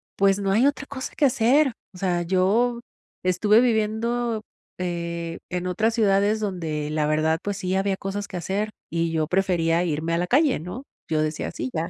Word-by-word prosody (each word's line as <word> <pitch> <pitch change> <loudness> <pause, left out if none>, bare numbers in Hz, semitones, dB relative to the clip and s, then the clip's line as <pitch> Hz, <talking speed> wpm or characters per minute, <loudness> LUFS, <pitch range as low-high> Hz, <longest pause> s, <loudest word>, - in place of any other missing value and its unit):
pues, 195 0 +3
no 195 -1 0
hay 230 +7 +4
otra 285 -1 +1
cosa 260 -2 -6
que 295 - +3
hacer, 265 +2 +3 0.2
o - - -12
sea, 175 -3 0
yo 200 +7 +2 0.4
estuve 205 +5 +4
viviendo, 230 0 0 0.4
eh, 170 -1 -3
en 180 0 -2
otras 220 +5 +1
ciudades 205 -1 +3
donde, 160 -7 -3
la 155 -1 0
verdad, 155 +1 +2
pues 205 -1 -2
sí, 185 -2 -2
había 195 0 +1
cosas 200 +1 -4
que 185 - -5
hacer, 200 +5 -2 0.2
y 165 0 -1
yo 155 -2 0
prefería 175 -3 +2
irme 160 0 -1
a 170 - +2
la 175 - 0
calle, 285 +1 +3
¿no? 180 - -7 0.2
Yo 155 -1 +1
decía: 155 0 -2
"Sí, 130 - -4
ya, 165 +1 -2
195 Hz, 185 wpm, -24 LUFS, 170-220 Hz, 0.4 s, hay